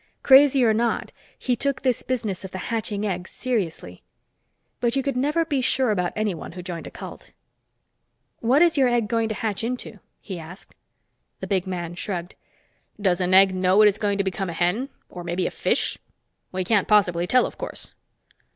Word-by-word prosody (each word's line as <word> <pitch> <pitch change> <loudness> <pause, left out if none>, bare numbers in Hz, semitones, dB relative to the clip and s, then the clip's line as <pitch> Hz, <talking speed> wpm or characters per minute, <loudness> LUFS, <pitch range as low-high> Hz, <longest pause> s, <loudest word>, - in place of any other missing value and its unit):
Crazy 270 -1 +7
or 220 - +4
not, 230 +2 0 0.3
he 250 - 0
took 275 +2 -1
this 255 -3 +1
business 220 -8 -3
of 190 - -6
the 185 - -7 0.2
hatching 215 -2 -2
egg 185 -2 -3
seriously. 175 - -3 0.8
But 240 +1 +1
you 270 - +1
could 275 -1 -1
never 300 +6 +1
be 285 -4 0
sure 255 -1 +2
about 180 -4 0
anyone 205 -8 -3
who 180 0 -8
joined 175 -2 -6
a - - -6
cult. - - -10 1.1
"What 260 +8 +4
is 335 -4 +3
your 265 - +5
egg 240 -3 +1
going 225 +1 0
to 220 - -2
hatch 220 -2 -3
into?" 235 -3 -4 0.2
he 190 -4 -7
asked. 165 +4 -11 0.7
The - - -5
big 190 -2 -1
man 175 -2 -4
shrugged. 175 -1 -4 0.7
"Does 190 -3 +1
an 180 +1 +2
egg 190 0 +7
know 185 +3 +4
it - - +8
is 205 - +1
going 205 -2 0
to 200 - +1
become 190 0 -3
a - - -4
hen 180 +11 0 0.2
or 175 - -9
maybe 175 +1 -2
a - - -1
fish? - - 0 0.5
We 185 0 -2
can't 200 +1 +2
possibly 180 -5 +3
tell, 255 +4 +4
of - - -8
course." - - -5
205 Hz, 190 wpm, -24 LUFS, 180-245 Hz, 1.1 s, it